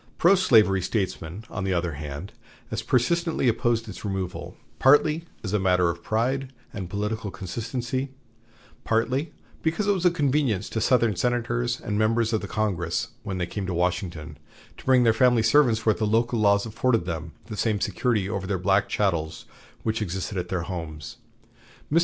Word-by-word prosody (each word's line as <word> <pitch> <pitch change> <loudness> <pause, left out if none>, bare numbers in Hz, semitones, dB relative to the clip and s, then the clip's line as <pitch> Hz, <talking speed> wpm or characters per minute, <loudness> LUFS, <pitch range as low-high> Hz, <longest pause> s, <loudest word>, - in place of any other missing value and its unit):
Pro 175 +4 +6
slavery 110 - +4
statesmen, 95 -1 -3
on 95 - -5
the 95 -1 0
other 85 0 0
hand, 75 +6 -7 0.4
as 110 +1 -2
persistently 160 +5 +1
opposed 115 0 +1
its 100 - -9
removal, 95 -3 -4 0.2
partly 150 +4 +4 0.2
as 100 -2 -4
a 105 - +3
matter 90 -2 +3
of 85 0 -10
pride 130 +7 -1 0.2
and 95 -6 -5
political 105 +2 -3
consistency, 120 +8 -4 0.7
partly 125 +7 0 0.3
because 165 +6 0
it 205 - +3
was 190 -3 0
a 180 - +6
convenience 140 - 0
to 110 - -1
Southern 115 -3 +3
senators 120 +2 0
and 105 -2 -2
members 115 +1 +2
of 110 - +1
Congress, 90 -6 -1
when 95 -5 -4
they 90 - -1
came 95 +1 -5
to 90 - -2
Washington, 85 -3 -2 0.4
to - - -15
bring 130 -1 +5
their 115 -2 +5
family 120 -1 +4
servants 115 -2 +4
where 110 - +5
the 110 +1 -1
local 115 +2 +1
laws 100 0 +3
afforded 115 -2 +1
them 80 -2 -5
the 110 -1 -7
same 105 -1 0
security 110 -4 0
over 100 -2 -3
their 100 -1 0
black 95 +2 +2
chattels 85 -6 -1 0.4
which 110 0 -1
existed 95 +1 -3
at 90 -1 -2
their 90 -3 -1
homes. 80 -4 -6 0.8
Mr. 165 - +6
110 Hz, 170 wpm, -25 LUFS, 95-120 Hz, 0.8 s, Pro